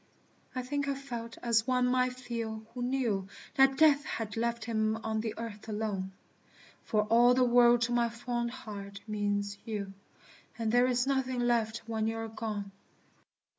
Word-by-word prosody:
I 255 - -2
think 285 +2 -2
I 280 - 0
felt 240 -4 -6
as 230 -2 +2
one 250 -1 +3
might 250 0 +2
feel 230 -3 -4
who 250 - -5
knew 245 -7 0 0.3
That 270 0 +5
Death 295 -2 +6
had 220 -6 -4
left 235 0 -1
him 220 -1 0
on 220 -1 -1
the 220 -1 -3
earth 225 -1 -7
alone. 205 -3 -2 0.7
For 210 -1 +1
"all 235 +3 +5
the 255 - +4
world" 240 -1 +5
to 240 - 0
my 240 -1 +2
fond 240 0 -3
heart 200 -5 -8
means 205 -1 -1
you; 205 -3 -4 0.6
And 225 -2 0
there 245 +1 +5
is 250 0 +2
nothing 260 -2 0
left 235 -2 +1
when 220 -1 -1
you 225 0 -2
are 225 0 -3
gone. 215 -2 -4
230 Hz, 170 wpm, -31 LUFS, 220-250 Hz, 0.7 s, Death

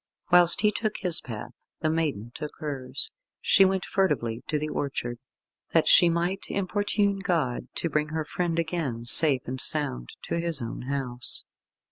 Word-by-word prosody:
Whilst 175 0 +5
he 210 0 +3
took 215 -1 -3
his 180 -4 +5
path 115 -4 -8 0.3
the 155 - +1
maiden 145 -9 -2
took 150 -1 -7
hers. 135 -3 -4 0.3
She 195 - +4
went 190 -1 0
furtively 120 - -1
to 155 - -1
the 150 +1 -3
orchard, 120 -5 -4 0.5
that - - +3
she 175 - +7
might 175 +3 -2
importune 200 +1 0
God 165 -10 -1
to - - -1
bring 150 -1 -1
her 155 0 -3
friend 170 +1 -2
again, 160 -9 -3
safe 135 +2 +6
and 130 +1 -3
sound 60 - +1
to 170 - -3
his 170 -3 0
own 115 -1 -6
house. 125 -4 -2
155 Hz, 160 wpm, -26 LUFS, 130-175 Hz, 0.5 s, she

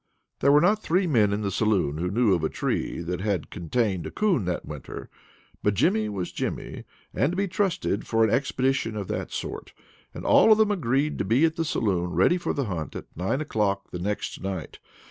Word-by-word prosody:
There 140 - +4
were 145 +1 +6
not 205 +5 +3
three 185 +1 +1
men 115 - +3
in 100 +1 -1
the 100 -2 -1
saloon 95 -8 +1
who 90 +1 -1
knew 110 0 +3
of 85 -3 0
a 80 - +1
tree - - -2
that 90 +1 -3
had 100 -6 -2
contained 95 +1 -1
a - - -5
coon 190 - +1
that 90 -1 -2
winter, 75 -4 -8 0.5
but 105 0 +1
Jimmy 110 +2 +2
was 95 -4 -4
Jimmy, - - -4 0.3
and 135 +8 +1
to - - -3
be 200 +1 0
trusted 185 - -1
for 115 0 +3
an 110 - +3
expedition 130 -3 0
of 100 -3 -4
that - - -3
sort; - - -6 0.4
and - - -8
all - - +6
of 215 - +7
them 215 -1 +3
agreed 145 - 0
to - - +1
be 120 +11 +3
at 160 0 0
the 165 - 0
saloon 95 - -1
ready 175 - +4
for - - -2
the 140 - -1
hunt 85 -7 -4
at - - -9
nine 95 - -1
o'clock 100 -8 -1
the 90 - -5
next 105 +4 -3
night. 95 -4 -5
110 Hz, 215 wpm, -26 LUFS, 95-150 Hz, 0.5 s, of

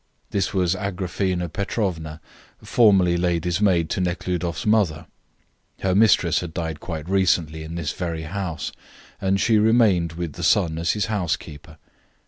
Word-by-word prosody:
This 100 - 0
was 90 -3 +1
Agraphena 95 -2 -2
Petrovna, 80 -4 -3 0.4
formerly 95 -7 +4
lady's 85 +1 0
maid 90 -6 +3
to - - -1
Nekhludoff's 90 -1 -2
mother. 100 -8 +2 0.8
Her 95 -1 +1
mistress 95 -6 +4
had 85 -2 -7
died 80 -3 -3
quite 80 -2 -6
recently 85 -5 +1
in 80 +2 -7
this 85 -2 -2
very 85 -3 -4
house, 90 0 -4 0.5
and 95 0 +1
she 110 0 +3
remained 105 -7 +3
with 85 -2 -5
the - - -7
son 80 -1 +2
as 85 +1 +1
his 105 -2 -1
housekeeper. 80 -6 -4
90 Hz, 140 wpm, -23 LUFS, 80-95 Hz, 0.8 s, formerly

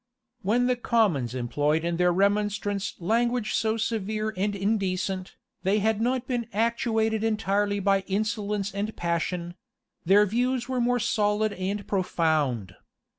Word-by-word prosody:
When 230 +5 +2
the 250 0 +2
commons 190 - +1
employed 145 +6 0
in 170 0 -1
their 180 0 +3
remonstrance 205 +1 0
language 235 +5 0
so 220 0 +1
severe 215 -1 -2
and 200 +2 -1
indecent, 195 -2 -1 0.3
they 195 +2 +2
had 220 +1 +1
not 250 +1 0
been 245 -3 -2
actuated 225 0 +1
entirely 205 -2 +1
by 195 0 +3
insolence 205 0 -1
and 205 +2 -3
passion; 170 0 -2 0.5
their 200 +4 +5
views 245 +4 0
were 255 -1 -1
more 245 +1 +2
solid 210 -1 +1
and 200 +2 -3
profound. 155 - 0
205 Hz, 130 wpm, -26 LUFS, 185-225 Hz, 0.5 s, their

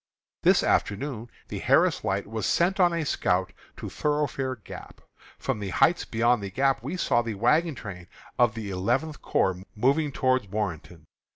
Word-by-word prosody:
This - - +4
afternoon 120 +2 -1 0.2
the - - -4
Harris - - +3
Light 95 +2 -1
was 110 0 -3
sent 185 +3 +2
on 175 -2 +5
a 165 -2 -1
scout 90 -8 0 0.2
to - - -6
Thoroughfare 145 -3 -1
Gap. 110 - -11 0.4
From - - -2
the 100 -2 -4
heights 175 - +3
beyond 120 0 +2
the 100 - -5
Gap 135 +6 +1
we 145 +10 -4
saw 120 -8 +2
the 115 -2 -4
wagon 150 - +2
train 90 -7 -8 0.3
of 120 -3 +4
the 105 -3 -5
Eleventh 125 +11 -1
Corps 95 -1 0
moving 140 +7 +2
toward 130 -7 0
Warrenton. 90 -5 -4
120 Hz, 165 wpm, -26 LUFS, 100-145 Hz, 0.4 s, on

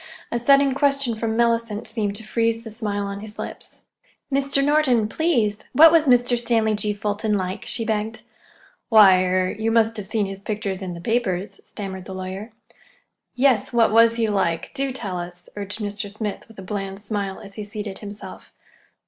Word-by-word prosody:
A 235 - 0
sudden 275 +2 +4
question 275 -3 +1
from 220 0 -2
Mellicent 230 -2 +1
seemed 210 -3 -2
to 220 - -4
freeze 230 +1 0
the 225 - -8
smile 210 -2 -3
on 200 0 -5
his 215 0 -9
lips. - - -8 0.5
"Mr. 275 0 +2
Norton, 275 -7 +3
please, 225 -7 +1
what 320 +5 +8
was 320 -2 +4
Mr. 245 -1 +4
Stanley 225 -2 +1
G. 210 0 0
Fulton 210 +1 -1
like?" 185 0 -4
she 230 - +1
begged. 220 0 -2 0.7
"Why—er—you 185 0 +4
must 225 0 +2
have 205 -2 -6
seen 210 0 0
his 195 0 -7
pictures 205 -2 -3
in 185 -2 -4
the 170 - -9
papers," 205 -3 -1
stammered 190 -2 -7
the 190 - -7
lawyer. 190 +4 -6 0.8
"Yes, 250 -5 +2
what 230 -2 +4
was 230 +1 +5
he 230 -1 +1
like? 180 -5 -1
Do 275 -1 -2
tell 200 -8 -4
us," 175 0 -8
urged 205 0 -5
Mr. 205 -1 -4
Smith 210 -1 -5
with 225 - -17
a 190 - -8
bland 195 0 -5
smile, 205 -2 -4
as 200 -1 -12
he 210 - -6
seated 205 -1 -6
himself. 205 0 -9
215 Hz, 175 wpm, -23 LUFS, 200-235 Hz, 0.8 s, what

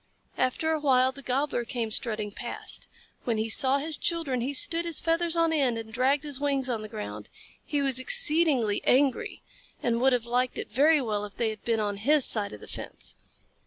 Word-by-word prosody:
After 255 +5 0
a 315 - 0
while 260 -3 +3
the 275 +1 -12
Gobbler 265 -1 -1
came 235 -2 -4
strutting 215 -2 -1
past. 235 +3 -5 0.4
When 230 -3 -1
he 220 +1 -1
saw 265 +3 +4
his 305 +2 -1
children, 330 - -1
he 260 +4 -2
stood 330 +4 +2
his 335 -2 +1
feathers 335 0 +1
on 330 -1 +2
end 265 -7 +1
and 225 -1 -8
dragged 265 +4 +1
his 290 -3 -3
wings 275 -3 0
on 225 -3 -2
the 215 - -8
ground. 105 - -7 0.3
He 290 -2 -1
was 265 -2 0
exceedingly 300 - +3
angry, 265 0 +1 0.4
and 235 0 0
would 265 0 +4
have 240 -2 0
liked 245 +1 -1
it - - -6
very 295 +2 +4
well 210 -3 -2
if 205 -1 -9
they 225 -2 0
had 215 - -10
been 230 -1 0
on 205 -1 -2
his 280 +6 +3
side 210 -3 +3
of 105 - -10
the - - -11
fence. - - -5
255 Hz, 205 wpm, -27 LUFS, 225-295 Hz, 0.4 s, saw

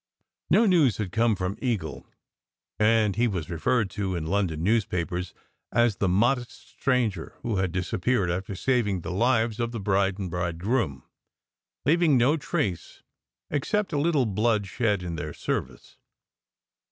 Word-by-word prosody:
No 230 - +5
news 165 - +4
had 100 -5 -3
come 115 0 +2
from 95 +1 -3
Eagle, 100 - -3 0.7
and 105 -2 +3
he 120 +2 +2
was 90 -6 -3
referred 110 +5 0
to 95 -3 -2
in 80 -2 -3
London 85 -3 -1
newspapers 90 -4 0 0.4
as 120 -4 +2
"the 100 - +1
modest 120 +6 0
stranger" 120 -10 -1
who 115 -4 -1
had 95 -2 0
disappeared 90 +2 0
after 95 +2 -3
saving 105 -5 0
the 90 - -5
lives 115 +2 +1
of 120 0 -1
the 115 - -4
bride 95 -1 +1
and 95 -4 -4
bridegroom, 85 - -1 0.8
"leaving 160 -1 +4
no 125 +6 +4
trace 150 - -3 0.5
except 190 +6 -1
a 145 - +1
little 150 -4 +2
blood 105 0 +1
shed 100 -1 0
in 85 -2 -4
their 75 -2 -5
service." - - -4
105 Hz, 145 wpm, -26 LUFS, 90-120 Hz, 0.8 s, No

